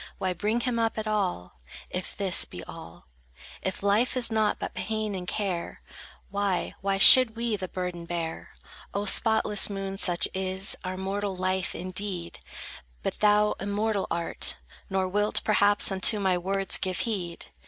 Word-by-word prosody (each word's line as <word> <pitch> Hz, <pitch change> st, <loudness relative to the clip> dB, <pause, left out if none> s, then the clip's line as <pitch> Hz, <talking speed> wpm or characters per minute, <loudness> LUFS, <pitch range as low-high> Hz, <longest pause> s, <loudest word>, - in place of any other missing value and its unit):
Why 185 Hz, -1 st, -2 dB
bring 215 Hz, +7 st, -1 dB
him 240 Hz, -1 st, -1 dB
up 225 Hz, -1 st, -1 dB
at 220 Hz, -, -3 dB
all, 90 Hz, -, -3 dB, 0.3 s
If 180 Hz, 0 st, -5 dB
this 195 Hz, -3 st, +1 dB
be 90 Hz, -, -10 dB
all? -, -, -12 dB, 0.6 s
If 190 Hz, +1 st, -4 dB
life 215 Hz, +6 st, +1 dB
is 240 Hz, -2 st, +5 dB
nought 215 Hz, -1 st, +1 dB
but -, -, -6 dB
pain 215 Hz, +2 st, -3 dB
and 180 Hz, -2 st, -6 dB
care, 185 Hz, -5 st, -4 dB, 0.5 s
Why, 200 Hz, -2 st, -1 dB
why 195 Hz, 0 st, -1 dB
should 235 Hz, +3 st, +8 dB
we 230 Hz, -1 st, -2 dB
the 190 Hz, -2 st, -5 dB
burden 180 Hz, -2 st, -5 dB
bear? 165 Hz, -1 st, -5 dB, 0.4 s
O 200 Hz, +1 st, -1 dB
spotless 215 Hz, 0 st, +4 dB
moon, 195 Hz, -1 st, -5 dB
such 175 Hz, -4 st, +4 dB
is 190 Hz, +1 st, 0 dB
Our 185 Hz, 0 st, -5 dB
mortal 195 Hz, +1 st, -3 dB
life, 185 Hz, 0 st, -2 dB
indeed; 185 Hz, -1 st, -5 dB, 0.6 s
But -, -, -4 dB
thou 210 Hz, 0 st, +3 dB
immortal 205 Hz, +1 st, -2 dB
art, 170 Hz, 0 st, -1 dB, 0.3 s
Nor 190 Hz, -1 st, -1 dB
wilt, 205 Hz, +3 st, +1 dB
perhaps, 205 Hz, -1 st, +4 dB
unto 195 Hz, +3 st, +4 dB
my 190 Hz, -2 st, +1 dB
words 195 Hz, +2 st, +1 dB
give 185 Hz, -2 st, -2 dB
heed. 180 Hz, -7 st, -5 dB
195 Hz, 155 wpm, -26 LUFS, 185-210 Hz, 0.6 s, should